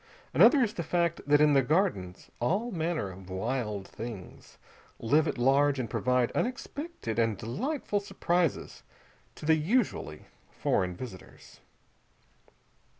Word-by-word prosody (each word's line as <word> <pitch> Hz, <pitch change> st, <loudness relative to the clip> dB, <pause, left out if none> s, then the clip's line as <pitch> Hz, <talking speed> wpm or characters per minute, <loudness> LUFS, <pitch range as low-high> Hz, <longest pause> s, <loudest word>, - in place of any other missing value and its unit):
Another 280 Hz, -4 st, +6 dB
is 215 Hz, -2 st, -1 dB
the 175 Hz, -, -3 dB
fact 170 Hz, 0 st, 0 dB
that 145 Hz, 0 st, +5 dB
in 150 Hz, -1 st, +5 dB
the 135 Hz, -, +5 dB
Gardens 125 Hz, -, -1 dB
all 195 Hz, -, 0 dB
manner 160 Hz, -, -2 dB
of 95 Hz, 0 st, -12 dB
wild 105 Hz, 0 st, -3 dB
things 110 Hz, -6 st, -9 dB, 0.4 s
live 145 Hz, +6 st, +2 dB
at -, -, -2 dB
large 135 Hz, +3 st, +3 dB
and 125 Hz, -, -2 dB
provide 125 Hz, -1 st, +1 dB
unexpected 265 Hz, -, -3 dB
and 115 Hz, -3 st, +1 dB
delightful 205 Hz, -, -2 dB
surprises 180 Hz, -5 st, -1 dB, 0.5 s
to -, -, -9 dB
the 160 Hz, -, +5 dB
usually 160 Hz, -, 0 dB, 0.2 s
foreign 90 Hz, -1 st, -1 dB
visitors. 100 Hz, -5 st, -11 dB
145 Hz, 125 wpm, -29 LUFS, 115-180 Hz, 0.5 s, Another